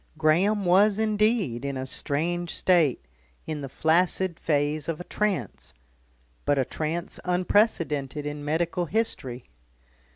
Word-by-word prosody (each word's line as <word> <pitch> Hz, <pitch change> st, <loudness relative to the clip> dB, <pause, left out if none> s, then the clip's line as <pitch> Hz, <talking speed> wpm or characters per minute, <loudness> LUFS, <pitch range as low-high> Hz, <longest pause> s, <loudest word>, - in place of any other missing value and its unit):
Graham 185 Hz, +7 st, +2 dB
was 195 Hz, +3 st, +4 dB
indeed 215 Hz, -, +1 dB
in 140 Hz, -1 st, -3 dB
a 130 Hz, -, -3 dB
strange 165 Hz, +6 st, -1 dB
state, 165 Hz, -, +2 dB, 0.4 s
in 155 Hz, -2 st, -4 dB
the 135 Hz, -, -6 dB
flaccid 170 Hz, +4 st, +1 dB
phase 150 Hz, +1 st, 0 dB
of 165 Hz, -, -2 dB
a -, -, -5 dB
trance, 185 Hz, -, -3 dB, 0.7 s
but 145 Hz, -, +1 dB
a 135 Hz, -, +2 dB
trance 160 Hz, +5 st, -4 dB
unprecedented 170 Hz, -, +1 dB
in 145 Hz, 0 st, -5 dB
medical 170 Hz, +3 st, -1 dB
history. 135 Hz, -, -3 dB
165 Hz, 125 wpm, -26 LUFS, 145-185 Hz, 0.7 s, was